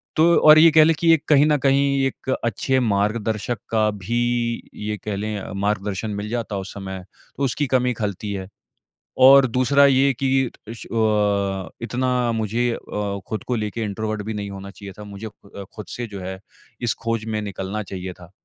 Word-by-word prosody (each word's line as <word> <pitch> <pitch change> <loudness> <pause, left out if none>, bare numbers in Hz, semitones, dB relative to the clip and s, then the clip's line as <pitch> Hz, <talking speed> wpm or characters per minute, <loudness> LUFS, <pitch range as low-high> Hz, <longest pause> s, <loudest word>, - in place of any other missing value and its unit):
तो 170 +2 +5
और 155 0 +8
ये 165 0 +7
कह 155 0 +7
लें 165 0 +4
कि 165 -1 +4
एक 160 - +1
कहीं 145 -1 +6
न 150 -1 +3
कहीं 140 0 +2
एक 130 - -7 0.2
अच्छे 130 +4 0
मार्गदर्शक 110 +1 -1
का 110 -1 +2
भी 105 +3 -4 0.6
ये 105 0 -4
कह 105 -2 -2
लें 105 0 -3 0.2
मार्गदर्शन 105 0 -1
मिल 100 +1 -4
जाता 115 -3 -3
उस 95 0 -6
समय, 95 -2 -7 0.3
तो 140 - -2
उसकी 135 +2 0
कमी 125 -1 +1
ख़लती 105 -2 -4
है। 95 -1 -5 0.7
और 135 0 +8
दूसरा 130 +4 +4
ये 135 0 +4
कि 135 - +2 0.4
इश 115 - -7
अ 105 -4 0
इतना 125 0 0
मुझे 115 +2 0
अ 100 -3 -4
खुद 110 - -4
को 125 - 0
लेके 110 +1 -3
इंट्रोवर्ट 110 +1 -3
भी 110 - -3
नहीं 100 -1 -4
होना 100 0 -8
चाहिए 100 -1 -10
था। - - -7
मुझे 100 +2 -8
खु 105 -1 -16
अ 100 - -8
खुद 105 - -7
से 120 -1 -5
जो 100 -2 -8
है 95 +1 -6 0.4
इस 120 -3 +1
खोज 115 -1 -1
में 110 -1 -2
निकलना 100 +1 -4
चाहिए 95 -1 -6
था। 85 0 -16
110 Hz, 190 wpm, -22 LUFS, 100-125 Hz, 0.7 s, और